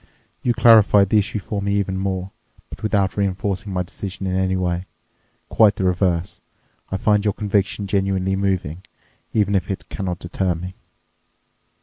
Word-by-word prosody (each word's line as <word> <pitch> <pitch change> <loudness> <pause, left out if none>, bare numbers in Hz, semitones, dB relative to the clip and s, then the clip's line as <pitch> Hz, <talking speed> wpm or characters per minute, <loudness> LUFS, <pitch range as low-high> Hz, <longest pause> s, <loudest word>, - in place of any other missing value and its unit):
You 120 -2 +1
clarified 110 -4 +6
the 105 - +4
issue 105 +1 -2
for 100 0 -4
me 100 0 0
even 100 -2 0
more, 95 0 -3 0.4
but - - -9
without 100 -3 +1
reinforcing 100 +1 -2
my 90 -1 -1
decision 95 +2 -7
in 95 -1 -1
any 95 0 +1
way—quite 95 +3 -1
the 100 - -3
reverse. 90 -1 0 0.5
I 95 - 0
find 105 +1 +2
your 105 -2 0
conviction 100 -1 0
genuinely 95 -1 0
moving, 95 -4 -1 0.5
even 100 -2 +1
if 95 -2 0
it 95 - -5
cannot 90 -3 -3
deter 90 +1 -2
me." 90 +3 -7
95 Hz, 150 wpm, -21 LUFS, 95-100 Hz, 0.5 s, clarified